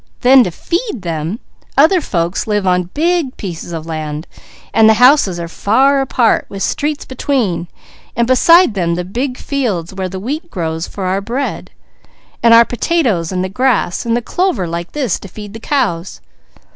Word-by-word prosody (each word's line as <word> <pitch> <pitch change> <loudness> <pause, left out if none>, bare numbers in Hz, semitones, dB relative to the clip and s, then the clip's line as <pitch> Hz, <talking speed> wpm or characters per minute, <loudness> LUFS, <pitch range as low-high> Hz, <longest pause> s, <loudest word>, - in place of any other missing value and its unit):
Then 260 0 +7
to - - -1
feed 335 - -3
them, 165 +4 -3 0.4
other 325 +6 +5
folks 175 - -2
live 210 -2 0
on 180 -1 +1
big 330 -3 0
pieces 175 -3 -6
of 160 -2 -5
land; 155 -1 -5 0.5
the 220 0 +5
houses 245 - +4
are 170 - -4
far 265 +10 +2
apart, 250 -3 +1
with 195 -1 -5
streets 295 0 -2
between, 245 -10 -1 0.5
and 235 - +2
beside 330 - +5
them 170 -4 0
the 180 0 -3
big 250 +7 -3
fields 210 - -2
where 190 -1 -4
the 190 +1 -6
wheat 295 - -4
grows 165 - -3
for 195 - -6
our 190 +2 0
bread, 245 +7 -4 0.7
and 230 - +5
our 230 0 +8
potatoes, 240 - 0
and 185 -1 -1
the - - -1
grass, 215 -3 0
and 235 0 0
the 240 - -3
clover 360 - 0
like 170 +1 -5
this 265 - -1
to - - -10
feed 205 +2 -10
the 225 - -8
cows. 210 - -2
215 Hz, 170 wpm, -16 LUFS, 175-270 Hz, 0.7 s, our